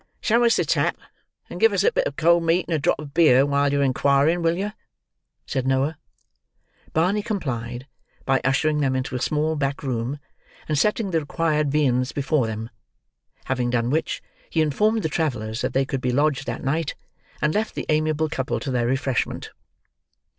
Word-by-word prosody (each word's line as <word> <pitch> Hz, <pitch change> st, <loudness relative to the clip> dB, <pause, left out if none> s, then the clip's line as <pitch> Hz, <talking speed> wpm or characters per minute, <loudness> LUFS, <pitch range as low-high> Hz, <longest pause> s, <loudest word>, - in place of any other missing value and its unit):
"Show 235 Hz, +1 st, +2 dB
us 230 Hz, -, +4 dB
the -, -, +1 dB
tap, -, -, +1 dB, 0.5 s
and -, -, -8 dB
give 450 Hz, -, +5 dB
us -, -, +2 dB
a 470 Hz, -, +4 dB
bit -, -, +1 dB
of -, -, -6 dB
cold 170 Hz, +1 st, +4 dB
meat 165 Hz, +2 st, +1 dB
and 170 Hz, -, -2 dB
a 155 Hz, -, +1 dB
drop -, -, +1 dB
of 145 Hz, -1 st, -9 dB
beer 140 Hz, -5 st, +5 dB
while 140 Hz, 0 st, +1 dB
yer 140 Hz, 0 st, +2 dB
inquiring, 140 Hz, +5 st, +2 dB
will 165 Hz, 0 st, +1 dB
yer?" 205 Hz, +2 st, -3 dB, 0.7 s
said 130 Hz, -2 st, -2 dB
Noah. 135 Hz, +4 st, +1 dB, 1.0 s
Barney 185 Hz, +6 st, +1 dB
complied 125 Hz, -, -4 dB, 0.4 s
by 135 Hz, -1 st, +2 dB
ushering 150 Hz, +4 st, +1 dB
them 135 Hz, -3 st, +1 dB
into 130 Hz, 0 st, -3 dB
a 125 Hz, -, -3 dB
small 155 Hz, +2 st, 0 dB
back 140 Hz, -1 st, -2 dB
room, 125 Hz, +1 st, -2 dB, 0.5 s
and 155 Hz, -, 0 dB
setting 210 Hz, -, +1 dB
the 165 Hz, -, +2 dB
required 150 Hz, -1 st, 0 dB
viands 130 Hz, -4 st, +1 dB
before 140 Hz, -3 st, +1 dB
them; 110 Hz, +1 st, -5 dB, 0.7 s
having 125 Hz, -2 st, -1 dB
done 120 Hz, 0 st, 0 dB
which, 160 Hz, +2 st, -1 dB, 0.3 s
he 160 Hz, -, +2 dB
informed 210 Hz, +9 st, +1 dB
the -, -, +1 dB
travellers 125 Hz, -9 st, -2 dB
that 130 Hz, 0 st, -2 dB
they 135 Hz, 0 st, +2 dB
could 135 Hz, -1 st, -3 dB
be 125 Hz, -, 0 dB
lodged 140 Hz, 0 st, +1 dB
that -, -, -4 dB
night, 145 Hz, +2 st, -1 dB, 0.4 s
and 150 Hz, 0 st, +1 dB
left 215 Hz, +1 st, -1 dB
the -, -, -4 dB
amiable 155 Hz, 0 st, +1 dB
couple 135 Hz, -4 st, -2 dB
to 135 Hz, -, -4 dB
their 120 Hz, -2 st, +1 dB
refreshment. 135 Hz, -1 st, -1 dB
145 Hz, 185 wpm, -23 LUFS, 130-165 Hz, 1.0 s, give